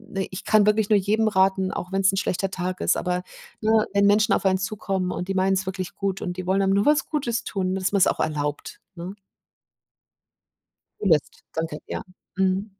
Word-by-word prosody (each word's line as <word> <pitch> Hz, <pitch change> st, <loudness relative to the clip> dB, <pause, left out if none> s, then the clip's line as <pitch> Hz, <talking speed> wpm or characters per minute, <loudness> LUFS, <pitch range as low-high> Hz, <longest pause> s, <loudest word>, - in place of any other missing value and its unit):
äh, 195 Hz, 0 st, -1 dB
ich 185 Hz, -, -7 dB
kann 215 Hz, -2 st, +4 dB
wirklich 210 Hz, 0 st, +2 dB
nur 210 Hz, -, +5 dB
jedem 215 Hz, +3 st, +1 dB
raten, 190 Hz, -2 st, +2 dB
auch 180 Hz, -, -5 dB
wenn's 195 Hz, 0 st, +3 dB
'n -, -, 0 dB
schlechter 195 Hz, -1 st, -1 dB
Tag 185 Hz, -1 st, -3 dB
ist, -, -, +2 dB
aber, 180 Hz, 0 st, -1 dB, 0.4 s
ne, 220 Hz, 0 st, +3 dB
wenn 200 Hz, 0 st, +4 dB
Menschen 210 Hz, +1 st, +4 dB
auf -, -, 0 dB
einen 190 Hz, -1 st, +3 dB
zukommen 190 Hz, -1 st, -2 dB
und 180 Hz, -, -4 dB
die 195 Hz, -, -1 dB
meinen 190 Hz, 0 st, +2 dB
es 190 Hz, 0 st, -2 dB
wirklich 185 Hz, -1 st, -4 dB
gut 195 Hz, -1 st, -2 dB
und 180 Hz, -2 st, -4 dB
die 185 Hz, 0 st, -5 dB
wollen 195 Hz, +1 st, +2 dB
einem 195 Hz, 0 st, +2 dB
nur 200 Hz, +1 st, +2 dB
was 300 Hz, +1 st, +3 dB
Gutes 240 Hz, -7 st, -1 dB
tun, 190 Hz, -3 st, -2 dB
dass 190 Hz, 0 st, -1 dB
man's 200 Hz, -2 st, +4 dB
auch -, -, 0 dB
erlaubt, 150 Hz, -1 st, -3 dB, 0.2 s
ne? 175 Hz, +2 st, -6 dB, 1.9 s
Zulässt. 165 Hz, -8 st, +1 dB
Danke. 160 Hz, -2 st, -3 dB
Ja. -, -, -4 dB, 0.3 s
Mhm. 190 Hz, +1 st, +1 dB
190 Hz, 200 wpm, -24 LUFS, 185-205 Hz, 1.9 s, nur